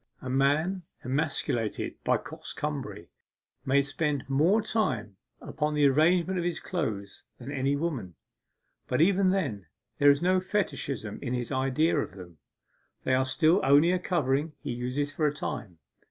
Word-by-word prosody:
A 130 - -5
man 150 +8 +2 0.2
emasculated 130 -5 -2
by - - +3
coxcombry - - -6 0.6
may 140 +1 +4
spend 145 -1 -2
more 155 +10 +3
time 130 - -1 0.2
upon 150 0 -2
the 145 -1 +4
arrangement 170 +6 +3
of - - -1
his 175 -1 -2
clothes 110 - -4 0.2
than 130 +3 -8
any 140 0 0
woman, 140 - -3 0.7
but - - 0
even 190 +3 +4
then 135 - -1 0.3
there 145 - +7
is 140 0 +5
no 185 +1 +3
fetichism 140 - -2
in 125 -2 -2
his 125 +1 -3
idea 135 +5 +1
of - - -3
them 85 -5 -12 0.6
they 130 - +1
are 130 0 +3
still 160 +8 +3
only 145 +5 +5
a 185 - +1
covering 150 -4 0
he - - -5
uses 125 +4 -2
for 155 - +1
a 145 - 0
time. 100 - -5
145 Hz, 155 wpm, -28 LUFS, 130-170 Hz, 0.7 s, there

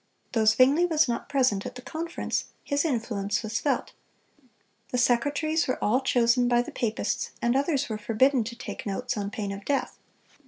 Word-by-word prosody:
Though 225 -2 +1
Zwingle 265 +10 +5
was 315 -3 +3
not 235 -1 -3
present 255 -8 +2
at - - -7
the 250 - -8
conference, 330 +4 -3 0.2
his 285 +2 0
influence 220 -7 -1
was 220 +1 -2
felt. 280 -4 -1 1.0
The 250 - -1
secretaries 285 +6 +1
were 255 - 0
all 245 +6 +2
chosen 245 -1 +3
by 240 0 +3
the - - -8
papists, 225 -2 -2
and 240 +1 +1
others 285 0 +1
were 215 -2 -4
forbidden 240 +4 +2
to 235 +1 -6
take 235 - -7
notes, 245 +5 -2
on 200 -2 -3
pain 205 -1 -4
of 200 0 -7
death. 275 +4 -2
245 Hz, 180 wpm, -27 LUFS, 220-280 Hz, 1.0 s, Zwingle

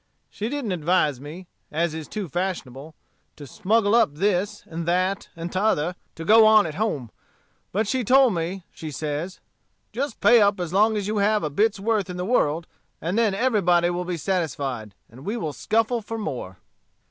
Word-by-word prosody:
She 215 +2 -4
didn't 275 -6 -3
advise 160 -5 +1
me, 160 +6 -9 0.3
as 160 +1 0
is 160 -1 -6
too 210 -3 -5
fashionable, 155 -4 -4 0.4
to 145 - -10
smuggle 205 - +1
up 225 -11 +3
this, 200 +3 0
and 165 0 -6
that, 185 +3 0
and 170 +1 -6
t'other, 185 -4 +1 0.2
to 165 - -7
go 220 +4 +7
on 215 -1 +6
at 160 - -4
home. 150 - -2 0.6
But 210 +3 0
she 255 +3 0
told 260 0 +5
me, 175 +2 -3
says 155 +3 -4
she, - - -28 0.6
'Just 280 -4 -3
pay 240 -2 +6
up 200 -1 +3
as 175 -1 -4
long 215 +2 +3
as 205 - -2
you 215 0 -1
have 210 +1 +2
a 150 - -2
bit's 210 +6 +1
worth 210 -2 0
in 180 - -5
the 180 - -3
world; 165 -8 +1 0.3
and 170 +4 -2
then 220 -4 +2
everybody 180 -7 +2
will 175 +1 -2
be 175 -1 -3
satisfied, 140 - -3
and 125 +4 -14
we 210 +7 -3
will 155 -9 -3
scuffle 225 - 0
for 225 +2 -6
more.' 120 - -5
185 Hz, 185 wpm, -24 LUFS, 160-215 Hz, 0.6 s, go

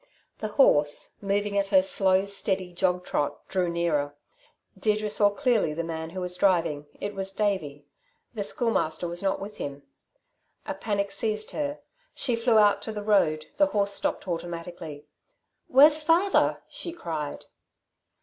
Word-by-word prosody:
The 215 - -2
horse, 145 - +4
moving 200 0 0
at 200 - 0
her 190 -2 +5
slow, 190 0 +3
steady 190 -2 -2
jog 180 0 0
trot, 145 - -2
drew 180 -2 0
nearer. 155 -4 -1 0.6
Deirdre 210 +1 0
saw 205 -1 +4
clearly 220 - +1
the 170 - -2
man 160 -1 -5
who 185 +2 -6
was 180 0 -1
driving. 165 -6 +1
It 205 - -4
was 195 -1 -2
Davey. 185 -9 -2 0.5
The 220 - -4
Schoolmaster 190 -7 0
was 170 +1 -4
not 195 -1 0
with 205 +2 -8
him. 140 0 -6 0.8
A - - -3
panic 200 0 -2
seized 215 +1 -2
her. 290 -1 -3 0.3
She 245 - +1
flew 230 -1 +2
out 205 -1 +5
to 220 - -5
the 210 -1 -5
road, 155 -7 +2
the 295 0 +5
horse 200 -6 0
stopped - - -2
automatically. 170 -3 -6 0.6
"Where's 295 +4 +6
father?" 335 +5 +2
she 340 - -5
cried. 160 - -5
195 Hz, 150 wpm, -26 LUFS, 170-215 Hz, 0.8 s, Where's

